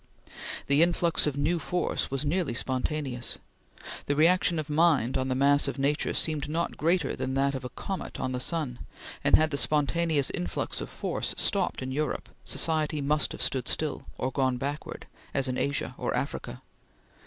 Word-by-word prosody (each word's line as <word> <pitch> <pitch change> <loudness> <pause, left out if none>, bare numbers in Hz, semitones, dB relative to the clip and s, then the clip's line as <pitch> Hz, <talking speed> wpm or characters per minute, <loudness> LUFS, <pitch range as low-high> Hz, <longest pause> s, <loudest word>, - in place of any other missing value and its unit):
The 140 +2 +4
influx 170 -2 +3
of 145 -1 -1
new 160 +4 +1
force 175 +3 -1
was 135 +2 -1
nearly 155 -5 0
spontaneous. 130 -1 -2 0.7
The 145 - +1
reaction 170 +2 +4
of 155 -1 -2
mind 150 -5 +3
on 130 - 0
the 130 - 0
mass 140 +2 +4
of 140 - -3
nature 140 +2 0
seemed 150 -2 +1
not 165 +2 -1
greater 165 -2 +1
than 130 - -2
that 140 +1 +2
of 130 - -4
a 125 - -4
comet 190 +9 -5
on 130 - -1
the 125 - -2
sun; 135 -4 -1 0.4
and - - +6
had 155 0 +3
the 140 - -1
spontaneous 150 0 +2
influx 90 -1 -3
of - - -5
force - - -3
stopped - - +1
in 130 - -4
Europe, 150 +1 -2 0.2
society 155 -2 +1
must 150 +1 +2
have - - -2
stood 130 -2 -1
still, 155 -2 -2
or 130 - -1
gone 130 -2 +1
backward, 140 +4 -5 0.3
as 135 -1 +3
in 130 - -1
Asia 140 +1 -1
or - - -1
Africa. - - -4
145 Hz, 175 wpm, -28 LUFS, 130-155 Hz, 0.7 s, and